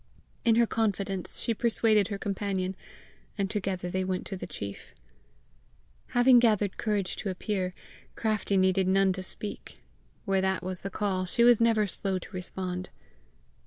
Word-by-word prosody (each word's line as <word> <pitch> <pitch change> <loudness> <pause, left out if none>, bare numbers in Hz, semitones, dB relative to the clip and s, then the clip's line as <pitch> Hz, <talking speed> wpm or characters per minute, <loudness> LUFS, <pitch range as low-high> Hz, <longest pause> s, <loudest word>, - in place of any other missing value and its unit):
In 230 -1 +4
her 235 0 +5
confidence 200 -4 -1
she 230 - 0
persuaded 220 -3 +2
her 200 - -4
companion, 195 -2 -2 0.6
and 195 -1 -1
together 190 -3 -2
they 185 +1 0
went 185 -1 -2
to 195 - -5
the 185 - -6
chief. 100 -1 -8 1.2
Having 245 0 +7
gathered 210 -4 +2
courage 205 -4 -1
to 200 - -3
appear, 185 -1 -2 0.4
Craftie 215 -3 0
needed 190 0 +3
none 190 0 +4
to 185 - -5
speak: 205 +2 -7 0.4
where 195 -2 +2
that 190 0 0
was 185 0 -3
the 195 - -4
call, 190 -2 -1
she 235 +6 +2
was 240 -1 +6
never 225 -2 +4
slow 195 0 -2
to 185 - -9
respond. 185 -1 -4
195 Hz, 155 wpm, -28 LUFS, 185-215 Hz, 1.2 s, Having